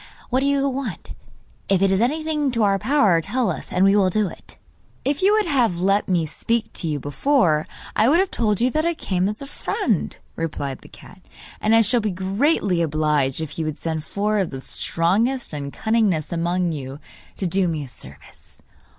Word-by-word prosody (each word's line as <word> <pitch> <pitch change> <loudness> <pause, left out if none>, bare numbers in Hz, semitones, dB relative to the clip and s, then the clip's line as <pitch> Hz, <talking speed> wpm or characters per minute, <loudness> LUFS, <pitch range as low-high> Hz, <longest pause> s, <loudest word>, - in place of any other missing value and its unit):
What 255 - +3
do 275 - +1
you 280 0 +2
want? 255 - -4 0.6
If 195 -1 +3
it 195 - +3
is 195 +2 +2
anything 305 +4 0
in 235 - -2
our 195 -1 +3
power, 215 - +3
tell 215 +4 0
us, - - -7
and 185 +2 +3
we 195 +1 +5
will 195 -3 +4
do 210 +2 +1
it.' - - -12 0.5
'If 280 +4 0
you 390 +2 +5
would 430 0 +3
have 245 - +1
let 195 +3 +2
me 175 -4 +1
speak 225 +9 -2
to 170 - -4
you 150 -2 -1
before, 155 - +1 0.3
I 220 +3 +4
would 315 - +5
have 380 0 +1
told 210 -4 +1
you 250 +2 +2
that 310 +3 0
I 340 0 0
come 185 -7 -1
as 210 +6 -5
a - - -6
friend,' 260 - -2 0.2
replied 145 -5 -4
the - - -15
cat; 185 - -15 0.4
'and 220 +1 +3
I 225 - +7
shall 235 +2 +2
be 215 - -1
greatly 195 - +1
obliged 150 -3 +1
if 160 +1 -6
you 160 - -1
would 155 0 -3
send 160 -2 -3
four 210 +5 -1
of 190 - 0
the 135 - -6
strongest 205 - 0
and 140 -1 -4
cunningest 205 -9 0
among 175 +1 0
you, 135 -3 -6 0.4
to 195 - -3
do 185 +1 +1
me 155 -3 -2
a - - -8
service. 125 - -13
195 Hz, 205 wpm, -22 LUFS, 165-245 Hz, 0.6 s, I